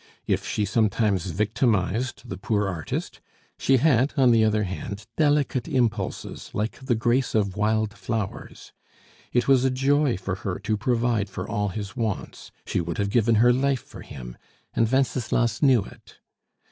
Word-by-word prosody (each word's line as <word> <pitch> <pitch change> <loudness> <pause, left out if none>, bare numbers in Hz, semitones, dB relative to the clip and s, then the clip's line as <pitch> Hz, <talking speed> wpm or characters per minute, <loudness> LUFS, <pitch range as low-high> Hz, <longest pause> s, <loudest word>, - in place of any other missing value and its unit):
If - - -1
she 105 - 0
sometimes 100 -3 +1
victimized 105 - 0
the 90 - -5
poor 105 0 0
artist, 85 -6 -4 0.4
she 135 - +4
had, 130 -1 +3
on 130 -3 +5
the 115 -1 +5
other 110 -1 +2
hand, 100 +2 -5
delicate 145 -4 +1
impulses 120 -5 -2
like 110 +5 -2
the 130 -3 0
grace 120 +3 +1
of 100 -4 +1
wild 110 0 +1
flowers; 110 0 -5 0.6
it 120 -1 +1
was 135 -2 +5
a 135 - +3
joy 135 -1 +2
to 95 +1 -4
her 95 0 -3
to 110 - -1
provide 115 -1 0
for 95 +1 -6
all 105 -2 -1
his 100 +2 -6
wants; 110 -5 -4
she - - -1
would 85 -1 -4
have 100 0 -1
given 115 0 +3
her 120 +3 +5
life 135 -1 0
for - - -12
him, - - -9 0.4
and 115 0 +1
Wenceslas 120 -3 +1
knew 130 -7 +5
it. - - -15
110 Hz, 160 wpm, -25 LUFS, 100-125 Hz, 0.6 s, on